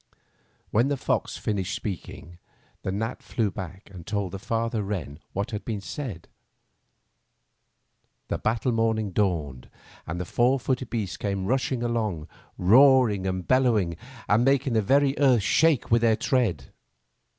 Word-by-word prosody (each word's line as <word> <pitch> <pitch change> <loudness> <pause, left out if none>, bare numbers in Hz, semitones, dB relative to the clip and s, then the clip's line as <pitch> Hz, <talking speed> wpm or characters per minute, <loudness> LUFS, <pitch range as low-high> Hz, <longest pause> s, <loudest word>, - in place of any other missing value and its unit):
When 115 +5 +3
the 140 0 0
fox - - -1
finished 95 -3 -2
speaking, 85 -3 -7 0.4
the 95 - -3
gnat 110 +5 -3
fiew 110 -4 -1
back 95 0 -8
and 90 -3 -9
told 100 -3 -2
the 100 - -6
father 115 +1 -1
wren 95 -7 -4
what 100 +5 -3
had 105 -1 -4
been 110 -3 -3
said. 100 - -6 2.0
The - - -2
battle 115 +3 0
morning 110 -3 0
dawned, 80 -11 -1 0.4
and 85 +2 -4
the 90 - -3
four 125 +8 +2
footed 130 0 -2
beasts 100 -6 -3
came 100 -2 -2
rushing 130 +1 0
along 110 -9 -2 0.3
roaring 115 -1 +5
and 95 -1 -3
bellowing, 115 -10 +2 0.3
and 105 +4 +3
making 135 -1 +2
the 110 - +3
very 135 +5 +3
earth 130 -7 +4
shake 160 +2 +2
with 115 0 +4
their 115 -1 +4
tread. 110 - 0
110 Hz, 145 wpm, -26 LUFS, 95-125 Hz, 2.0 s, roaring